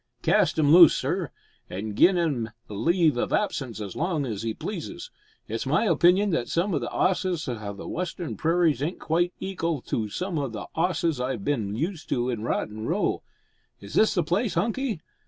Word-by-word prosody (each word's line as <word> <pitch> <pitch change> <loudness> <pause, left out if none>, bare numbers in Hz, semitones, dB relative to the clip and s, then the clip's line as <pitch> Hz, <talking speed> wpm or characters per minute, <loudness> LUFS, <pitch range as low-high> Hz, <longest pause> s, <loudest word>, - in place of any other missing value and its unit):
"Cast - - +3
'im 150 -1 +4
loose, 170 -3 +9
sir, 165 +3 -1 0.4
an' 105 +3 -4
gi'n 180 - +5
'im 140 -10 0 0.2
leave 155 - +2
of - - -1
absence 135 - -1
as 100 -4 -6
long 160 -3 -1
as 110 -4 -4
'e 115 -1 -2
pleases. - - -6 0.4
It's 115 +4 -3
my 150 +9 +2
opinion 180 +3 +4
that 125 -8 0
some 180 +4 0
the 130 -8 -1
'osses 180 +1 0
o' 110 -5 -4
the 100 - -9
western 175 -1 -4
prairies 165 -4 +2
ain't 160 +5 -2
quite 175 +2 0
eekal 170 -5 -2
to 110 -2 -1
some 180 - -3
o' 140 - -1
the 110 -4 -6
'osses 165 -4 0
I've 125 -5 -2
bin 110 -8 -1
used 165 - -3
to 125 0 0
in 115 -3 -3
Rotten 110 -1 -3
Row. - - 0 0.6
Is 100 0 -11
this 215 - +4
the 175 - +2
place, 185 +6 0
Hunky? 230 - -1
155 Hz, 180 wpm, -26 LUFS, 120-175 Hz, 0.6 s, loose